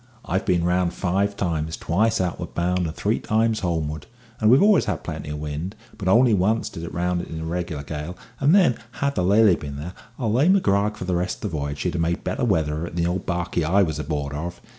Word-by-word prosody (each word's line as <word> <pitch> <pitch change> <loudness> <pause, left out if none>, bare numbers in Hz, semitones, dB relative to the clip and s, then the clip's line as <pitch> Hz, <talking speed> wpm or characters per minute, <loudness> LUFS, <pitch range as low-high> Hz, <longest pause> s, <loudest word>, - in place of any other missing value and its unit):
I've 95 +3 -1
been 85 -2 +2
round 90 0 +1
five 100 +2 0
times, 80 -3 -2
twice 110 +7 +1
outward 90 -2 -3
bound 90 0 0
and 80 - -6
three - - 0
times 110 0 +1
homeward, 80 -5 -2 0.3
and 110 - +4
we 125 - +7
always 205 +5 +5
had - - -2
plenty - - -6
of 75 - -4
wind; 75 +6 -4 0.2
but 100 -4 -5
only 115 +4 +5
once 105 +4 +1
did 80 - -8
I - - -4
round 90 +1 -1
it - - -8
in 80 - -6
a 80 - -5
reg'lar 85 -3 -3
gale, 75 +4 -6 0.2
and 145 +6 +4
then, 180 -12 +4
had 140 +2 -1
the 90 - 0
Lily 100 0 +5
been 70 -3 -7
there, 80 +6 -6 0.2
I'll 110 -4 -1
lay 140 +9 +4
my 195 - +6
grog 105 - +1
for 95 - -5
the 90 - -1
rest 90 +4 -2
of 100 - -2
the - - -4
v'yage 70 0 -3
she'd 90 - -2
have 85 - -1
made 85 +1 -1
better 90 - -2
weather 80 -9 +1
of 85 - -3
it 85 - -8
than 85 - 0
the - - +1
old 95 0 -4
barkie 85 -1 -1
I 95 +6 +3
was 80 -4 -2
aboard 75 -1 -3
of. 85 +4 -5
90 Hz, 250 wpm, -23 LUFS, 80-100 Hz, 0.3 s, we